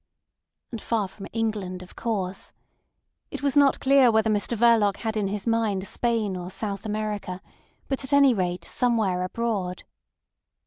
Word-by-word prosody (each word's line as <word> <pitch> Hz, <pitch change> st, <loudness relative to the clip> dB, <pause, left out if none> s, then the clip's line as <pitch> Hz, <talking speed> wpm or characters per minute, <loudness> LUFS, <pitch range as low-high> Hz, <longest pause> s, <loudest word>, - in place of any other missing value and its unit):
And 230 Hz, -, -6 dB
far 220 Hz, -4 st, -1 dB
from 195 Hz, +1 st, -10 dB
England, 210 Hz, -5 st, -3 dB
of 180 Hz, -, -16 dB
course. 195 Hz, -5 st, -3 dB, 0.8 s
It -, -, -7 dB
was 280 Hz, -1 st, +1 dB
not 285 Hz, -1 st, +4 dB
clear 270 Hz, -2 st, +5 dB
whether 220 Hz, -1 st, +2 dB
Mr 210 Hz, +3 st, 0 dB
Verloc 220 Hz, -3 st, +4 dB
had 220 Hz, -1 st, -3 dB
in 210 Hz, -2 st, 0 dB
his 200 Hz, 0 st, -4 dB
mind 220 Hz, -4 st, 0 dB
Spain 225 Hz, -5 st, 0 dB
or 180 Hz, 0 st, -6 dB
South 200 Hz, +1 st, -4 dB
America; 210 Hz, -3 st, -3 dB, 0.5 s
but 270 Hz, 0 st, -2 dB
at 265 Hz, -, -5 dB
any 280 Hz, -2 st, +6 dB
rate 180 Hz, -4 st, -2 dB
somewhere 220 Hz, -7 st, +1 dB
abroad. 190 Hz, -2 st, -2 dB
215 Hz, 150 wpm, -25 LUFS, 190-235 Hz, 0.8 s, any